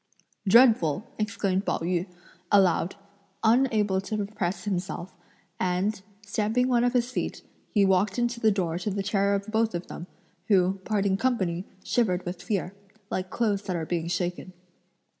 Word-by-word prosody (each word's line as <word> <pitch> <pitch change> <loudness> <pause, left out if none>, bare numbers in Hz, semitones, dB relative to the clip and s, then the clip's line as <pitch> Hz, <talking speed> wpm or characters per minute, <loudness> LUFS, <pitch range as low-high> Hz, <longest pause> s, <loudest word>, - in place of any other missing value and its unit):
"Dreadful!" 215 - +5 0.2
exclaimed 200 -3 0
Pao - - 0
yü, 175 +2 -1 0.4
aloud, 190 -3 +3 0.5
unable 220 -5 +3
to 215 +2 -4
repress 200 -3 -3
himself, 185 -2 -3 0.5
and, 185 +3 0 0.2
stamping 220 +5 +1
one 240 -2 +3
of 245 0 +2
his 245 0 +1
feet, - - -3 0.3
he 205 -2 +3
walked 190 +2 +2
into 240 -1 0
the 220 - +4
door 175 -5 -1
to 185 - -2
the 200 0 -2
terror 200 0 +2
of 200 0 -3
both 220 -2 +1
of 175 - -4
them, 175 - -8 0.4
who 190 -2 +3
parting 200 -3 +1
company, 190 -8 0 0.2
shivered 190 -7 +1
with 175 0 -5
fear, 195 -4 -2 0.4
like 185 0 -2
clothes 210 -3 0
that 185 -3 -3
are 165 -2 -2
being 170 0 -2
shaken. 175 +1 -3
195 Hz, 155 wpm, -27 LUFS, 180-220 Hz, 0.5 s, Dreadful